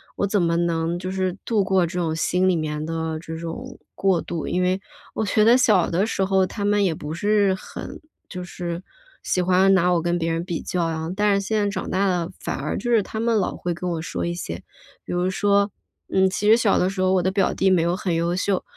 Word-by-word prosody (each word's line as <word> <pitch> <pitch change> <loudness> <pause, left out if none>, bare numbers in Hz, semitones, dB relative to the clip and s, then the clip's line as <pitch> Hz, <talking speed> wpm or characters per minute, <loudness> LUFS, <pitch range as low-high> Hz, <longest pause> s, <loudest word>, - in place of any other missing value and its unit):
我 - - 0
怎 200 -1 +1
么 170 0 +1
能 170 0 0
就 185 +1 -5
是 185 -1 -1
度 215 -4 +2
过 190 -2 +2
这 175 +2 -4
种 160 -2 -1
心 180 +3 +1
里 180 - +3
面 155 -2 -2
的 160 0 -3
这 160 0 -7
种 170 +11 -7
过 190 -3 +2
渡。 165 -3 -4
因 180 +1 0
为 185 +1 +1 0.3
我 - - -1
觉 210 +1 +2
得 230 +3 +6
小 215 -8 +4
的 185 +5 +1
时 195 -3 0
候 190 -1 +2
他 205 0 -4
们 205 0 +3
也 175 -5 +1
不 150 0 -6
是 205 +2 +2
很 190 - -8 0.3
就 180 -1 -6
是 175 -1 -5 0.4
喜 180 - 0
欢 185 +2 +4
拿 180 -1 +3
我 170 - +2
跟 175 +1 0
别 165 0 -1
人 165 +1 -1
比 175 -3 -3
较 180 -3 -1
啊， 160 0 -3
但 205 0 +3
是 200 - -5
现 215 +1 0
在 205 -1 +1
长 200 - -4
大 195 +2 +2
了 175 -2 0
反 - - -3
而 - - -2
就 240 - -3
是 225 -3 +4
他 220 - -6
们 230 0 +1
老 195 - -1
会 175 - -3
跟 175 +2 -5
我 165 - -2
说 165 - -3
一 170 - -1
些 90 - -6 0.4
比 - - -8
如 180 +1 +1
说 200 +1 +2 0.4
嗯， 190 0 +3
其 205 +2 0
实 220 - +8
小 225 -4 +3
的 180 - +2
时 190 -1 -3
候 185 0 +3
我 185 - +3
的 185 - +1
表 195 -1 +1
弟 190 - +2
没 185 -3 +4
有 170 +1 +1
很 185 -3 -2
优 170 +1 0
秀， 190 0 0
185 Hz, 270 characters per minute, -23 LUFS, 170-200 Hz, 0.4 s, 实